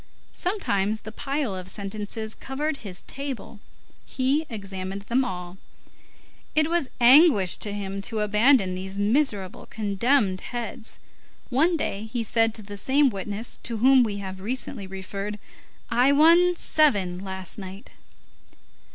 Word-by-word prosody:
Sometimes 215 - -1
the 215 - -8
pile 275 -2 -2
of 185 0 -7
sentences 210 +2 -4
covered 290 +3 -3
his 185 -7 -8
table; 275 -6 -6 0.4
he 275 +4 0
examined 195 -3 -6
them 240 +5 +1
all; 180 -5 -6 1.0
it 310 +1 +2
was 340 -7 0
anguish 245 - +6
to 210 - -2
him 195 -1 -4
to 215 +2 -2
abandon 210 -1 +4
these 190 +1 -6
miserable, 205 -3 0
condemned 210 -1 +1
heads. 235 -2 -6 0.5
One 325 +7 +3
day, 210 -7 -3
he 235 -1 -1
said 225 0 +2
to 215 - -6
the 205 0 -8
same 270 +5 +3
witness 205 +3 -6
to 230 -1 -3
whom 260 +3 +6
we 210 -4 0
have 190 -1 -7
recently 225 -1 -3
referred: 195 +2 -6 0.5
"I 250 +4 +4
won 340 +4 +6
seven 200 - +2
last 190 0 -7
night." 190 +1 -9
215 Hz, 135 wpm, -25 LUFS, 195-265 Hz, 1.0 s, anguish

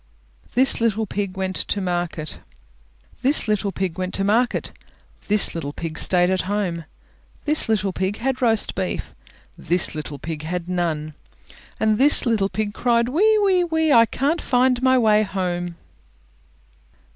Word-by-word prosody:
THIS 260 -1 +4
LITTLE 225 -1 0
PIG 200 -1 -4
WENT 190 -1 -3
TO 205 - -2
MARKET 175 -4 -4 0.8
This 270 0 +4
little 210 -1 -1
pig 190 -2 -4
went 185 0 -3
to 195 - -1
market; 230 +5 0 0.6
This 210 0 +5
little 145 -4 -5
pig 160 -1 -6
stayed 180 0 +3
at 185 - 0
home; 180 -6 -2 0.6
This 300 -5 +3
little 200 -3 0
pig 190 +3 -2
had 260 +2 -3
roast 225 -3 +1
beef; 190 -2 -4 0.4
This 175 +1 +1
little 150 -2 -6
pig 155 +2 -6
had 170 +2 -5
none; 165 -4 -2 0.6
This 220 +8 +3
little 215 -5 +1
pig 210 -1 -3
cried 235 0 +1
"Wee, 425 +10 +3
wee, 375 -3 +3
wee! 320 -3 +1
I 230 -1 +6
can't 290 +9 -1
find 250 -1 +1
my 260 0 +3
way 215 -3 +3
home!" 175 -4 -3
205 Hz, 145 wpm, -21 LUFS, 180-245 Hz, 0.8 s, I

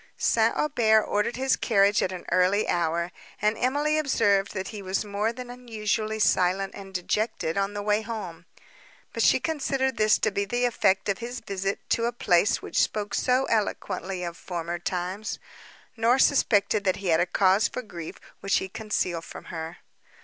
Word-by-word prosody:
St. - - +2
Aubert 220 -7 +3
ordered 210 +3 -1
his 265 +1 +2
carriage 200 -2 +3
at 185 - 0
an 185 -1 -7
early 185 +3 +3
hour, 170 0 0 0.3
and 210 +1 +2
Emily 290 +6 +1
observed, 205 -9 +2
that 190 0 -3
he 210 -2 -7
was 195 +2 -2
more 205 +2 -1
than 245 +1 -10
usually 215 0 -1
silent 190 -1 +2
and 195 -1 -10
dejected 185 -2 -1
on 200 +1 -1
the 205 - -3
way 210 +1 +2
home; 190 -7 -7 0.7
but - - -2
she - - +5
considered 270 -5 -1
this 215 0 +4
to 215 - 0
be 200 0 -1
the 240 +5 0
effect 200 -5 +1
of 200 -1 0
his 245 +1 -5
visit 195 -1 -4
to 230 - +2
a 235 - 0
place 205 -2 +2
which - - 0
spoke 210 -1 -1
so 255 +1 +2
eloquently 195 -3 -2
of 170 -1 -4
former 175 -1 -5
times, 185 +4 -3 0.6
nor 235 +2 +3
suspected 215 -7 +3
that 185 -1 +2
he 195 -2 -4
had 160 -1 +4
a 175 - +2
cause 195 +3 +3
of 255 -3 -6
grief 170 -4 -7 0.2
which 195 - +1
he 190 - -2
concealed 185 -4 -2
from - - -10
her. 165 +1 -6
205 Hz, 180 wpm, -26 LUFS, 185-230 Hz, 0.7 s, she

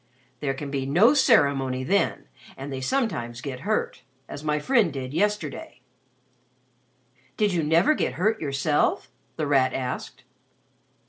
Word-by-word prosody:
There 135 -2 -2
can 140 0 -6
be 135 -1 -2
no 195 - +5
ceremony 140 - +3
then 195 +8 0 0.3
and 135 +1 -6
they 130 - -4
sometimes 130 - -2
get 130 -1 -6
hurt 215 0 -2 0.3
as 145 - -8
my 150 -1 0
friend 215 - +2
did 135 -1 -6
yesterday." 190 -4 -2 1.6
"Did 210 -3 +1
you 170 - +1
never 165 - +3
get 210 - -1
hurt 215 +9 0
yourself?" 145 0 0 0.2
The 155 - -2
Rat 135 -3 +2
asked. 125 -1 -5
145 Hz, 135 wpm, -25 LUFS, 135-200 Hz, 1.6 s, no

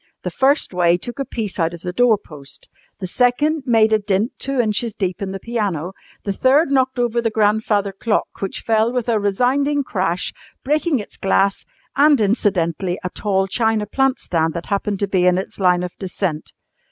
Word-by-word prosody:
The - - -3
first 275 -4 +2
way 175 -1 +3
took 240 +9 -8
a 275 - -1
piece 215 -6 -5
out 165 +1 0
of 170 - -13
the 180 0 -5
doorpost, 175 - -1 0.3
the 190 - -4
second 260 - +1
made 220 -2 +4
a 215 - +4
dint 205 +3 0
two 275 -1 -2
inches 220 -1 0
deep 190 +1 -3
in 195 -1 -3
the 195 - -5
piano, 195 -8 -2 0.3
the 200 - -2
third 275 - +3
knocked 260 -1 +2
over 240 -1 +1
the 230 - 0
grandfather 210 -1 +1
clock, 210 +3 -1
which 195 - -4
fell 225 +1 +2
with 250 -2 -2
a 225 -2 +2
resounding 260 +8 +1
crash, 185 -7 -1 0.3
breaking 300 +2 +1
its 210 - -8
glass, 195 0 +1 0.3
and 290 0 +5
incidentally 190 -4 0
a 180 - -3
tall 195 -2 0
china 220 +1 0
plant 270 +5 +1
stand 160 -1 -1
that 170 - -4
happened 200 0 -2
to 200 - +1
be 185 -2 +2
in 180 0 +4
its 190 - -5
line 180 -2 +3
of 180 - -4
descent. 180 -4 -3
210 Hz, 190 wpm, -20 LUFS, 185-245 Hz, 0.3 s, and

